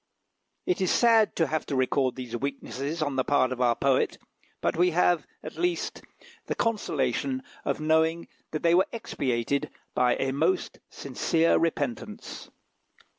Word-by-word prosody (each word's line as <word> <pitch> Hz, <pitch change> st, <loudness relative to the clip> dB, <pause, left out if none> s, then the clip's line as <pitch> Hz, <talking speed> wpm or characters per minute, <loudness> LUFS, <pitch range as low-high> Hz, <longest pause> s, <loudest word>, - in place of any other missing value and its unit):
It 365 Hz, -, 0 dB
is 185 Hz, -, +2 dB
sad 225 Hz, -3 st, +4 dB
to 165 Hz, -, +2 dB
have 155 Hz, 0 st, -2 dB
to 140 Hz, -, -2 dB
record 130 Hz, 0 st, +1 dB
these 125 Hz, -2 st, -6 dB
weaknesses 140 Hz, +4 st, -3 dB
on 145 Hz, -3 st, -2 dB
the 130 Hz, -, +2 dB
part 130 Hz, -2 st, +2 dB
of 130 Hz, 0 st, -3 dB
our 120 Hz, -1 st, +3 dB
poet, 135 Hz, 0 st, +1 dB, 0.4 s
but -, -, 0 dB
we 175 Hz, +2 st, +4 dB
have, 175 Hz, -2 st, +2 dB, 0.2 s
at -, -, -8 dB
least, 355 Hz, 0 st, -1 dB, 0.5 s
the -, -, -1 dB
consolation 135 Hz, -, -1 dB, 0.2 s
of -, -, -1 dB
knowing 160 Hz, +2 st, +2 dB, 0.2 s
that 155 Hz, -, -4 dB
they 170 Hz, 0 st, +4 dB
were 180 Hz, +2 st, +4 dB
expiated 140 Hz, -, -2 dB, 0.2 s
by 125 Hz, -1 st, +3 dB
a 135 Hz, -, -1 dB
most 350 Hz, -, 0 dB
sincere 165 Hz, 0 st, +1 dB
repentance. 145 Hz, -8 st, -3 dB
145 Hz, 150 wpm, -27 LUFS, 130-170 Hz, 0.5 s, sad